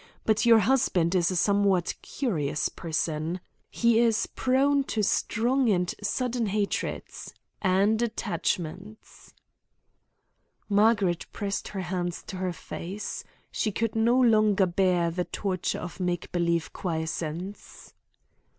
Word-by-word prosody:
But 220 Hz, +2 st, +2 dB
your 230 Hz, -1 st, +8 dB
husband 195 Hz, -7 st, +2 dB
is 180 Hz, -2 st, +3 dB
a 185 Hz, -, -2 dB
somewhat 195 Hz, -1 st, +2 dB
curious 155 Hz, -, -1 dB
person. 160 Hz, +1 st, -2 dB, 0.3 s
He 235 Hz, -1 st, +3 dB
is 230 Hz, -2 st, +3 dB
prone 275 Hz, +2 st, +2 dB
to 215 Hz, -4 st, -1 dB
strong 240 Hz, +5 st, +1 dB
and 180 Hz, -3 st, +1 dB
sudden 245 Hz, -3 st, -1 dB
hatreds 205 Hz, 0 st, -3 dB, 0.3 s
and 200 Hz, +4 st, +3 dB
attachments." 190 Hz, -2 st, -4 dB, 1.4 s
Margaret 205 Hz, -4 st, +2 dB
pressed 200 Hz, -1 st, -3 dB
her 195 Hz, -, -5 dB
hands 175 Hz, -1 st, -3 dB
to 190 Hz, -, -7 dB
her 185 Hz, -1 st, -1 dB
face. 180 Hz, +4 st, -6 dB, 0.3 s
She 215 Hz, -, -1 dB
could 225 Hz, +2 st, -2 dB
no 235 Hz, +3 st, +3 dB
longer 215 Hz, -5 st, +4 dB
bear 175 Hz, -2 st, +1 dB
the 180 Hz, +1 st, -2 dB
torture 185 Hz, -3 st, -2 dB
of 180 Hz, +2 st, -7 dB
make 180 Hz, -1 st, -2 dB
believe 170 Hz, -2 st, 0 dB
quiescence. 165 Hz, +2 st, -5 dB
195 Hz, 115 wpm, -27 LUFS, 175-220 Hz, 1.4 s, your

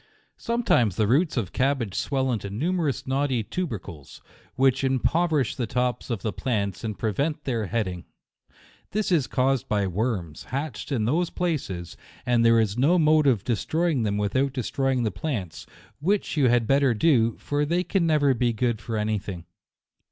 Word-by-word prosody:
Sometimes 230 Hz, -, +1 dB
the 110 Hz, -, +2 dB
roots 140 Hz, -, +2 dB
of 105 Hz, -7 st, -2 dB
cabbage 130 Hz, -6 st, 0 dB
swell 130 Hz, +5 st, 0 dB
into 105 Hz, -4 st, -3 dB
numerous 150 Hz, -, -1 dB
knotty 130 Hz, -3 st, 0 dB
tubercles, 105 Hz, -, -6 dB, 0.4 s
which 135 Hz, 0 st, +2 dB
impoverish 145 Hz, +2 st, +1 dB
the 120 Hz, -, -2 dB
tops 125 Hz, +2 st, -1 dB
of 115 Hz, -6 st, -3 dB
the 110 Hz, -, -2 dB
plants, 100 Hz, -6 st, -2 dB
and 110 Hz, -3 st, -4 dB
prevent 140 Hz, -, -1 dB
their 115 Hz, -6 st, -2 dB
head 110 Hz, +2 st, -1 dB
ing. 90 Hz, -2 st, -6 dB, 0.9 s
This 210 Hz, -1 st, 0 dB
is 155 Hz, -7 st, +2 dB
caused 130 Hz, 0 st, +1 dB
by 100 Hz, -2 st, +1 dB
worms, 95 Hz, -5 st, -3 dB
hatched 140 Hz, +4 st, -5 dB
in 115 Hz, -6 st, 0 dB
those 165 Hz, +8 st, +1 dB
places; 130 Hz, -, -3 dB, 0.3 s
and 120 Hz, -2 st, +3 dB
there 115 Hz, 0 st, +5 dB
is 110 Hz, +1 st, 0 dB
no 160 Hz, +8 st, +4 dB
mode 155 Hz, -2 st, +4 dB
of 115 Hz, -8 st, +2 dB
de 120 Hz, -, 0 dB
stroying 160 Hz, +2 st, 0 dB
them 105 Hz, -1 st, 0 dB
without 130 Hz, +7 st, 0 dB
destroying 130 Hz, 0 st, -1 dB
the 110 Hz, -, 0 dB
plants, 100 Hz, -, -5 dB, 0.3 s
which 190 Hz, +6 st, 0 dB
you 140 Hz, -4 st, +3 dB
had 120 Hz, -1 st, +3 dB
better 135 Hz, 0 st, +3 dB
do, 115 Hz, -3 st, +3 dB
for 145 Hz, 0 st, -1 dB
they 170 Hz, +4 st, +1 dB
can 185 Hz, -3 st, 0 dB
never 145 Hz, -3 st, +3 dB
be 120 Hz, -1 st, +1 dB
good 115 Hz, -1 st, -1 dB
for 110 Hz, 0 st, -4 dB
any 105 Hz, 0 st, 0 dB
thing. 95 Hz, -4 st, -8 dB
125 Hz, 175 wpm, -25 LUFS, 110-145 Hz, 0.9 s, there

